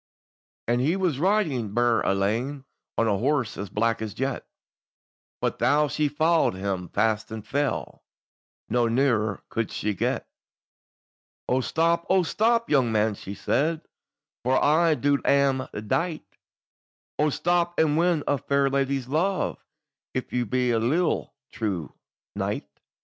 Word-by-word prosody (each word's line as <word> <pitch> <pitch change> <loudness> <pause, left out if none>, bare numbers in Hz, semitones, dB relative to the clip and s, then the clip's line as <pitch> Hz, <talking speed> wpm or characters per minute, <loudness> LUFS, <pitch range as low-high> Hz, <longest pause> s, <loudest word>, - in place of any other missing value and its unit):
And 120 +1 +2
he 155 +7 +2
was 180 -8 0
riding 155 - +1
burd 120 -1 +2
alane, 115 +8 0 0.3
On 115 - +2
a 100 -3 +1
horse 130 -3 0
as 100 -1 -5
black 115 +3 0
as 110 -2 -5
jet, 135 0 -3 0.9
But - - -1
tho' 150 +2 +3
she 150 +1 +1
followed 160 - +2
him 95 -2 -3
fast 110 -1 0
and 110 -1 -6
fell, 140 +3 -2 0.7
No 120 -1 +2
nearer 115 -4 +1
could 115 -2 -2
she 105 0 -2
get. 95 - -2 1.2
"O 130 +1 +2
stop! 170 +5 +1
O 190 -1 +4
stop! 230 +6 +1
young 130 -5 +3
man," 110 0 +2
she 100 0 -8
said; 155 +10 0 0.6
"For 130 +2 +2
I 160 +2 +4
in - - -5
dule 140 0 +3
am 135 -2 +2 0.2
dight; 165 - -1 0.9
O 150 +1 +3
stop, 175 +3 0
and 155 -2 +3
win 170 -2 +2
a 145 - +1
fair 140 0 +1
lady's 135 -1 0
luve, 170 +7 0 0.6
If 130 - -3
you 125 -2 0
be 125 +2 +1
a 115 - +2
leal 155 +10 0 0.2
true 100 - -3 0.4
knight." - - -2
135 Hz, 145 wpm, -25 LUFS, 115-155 Hz, 1.2 s, O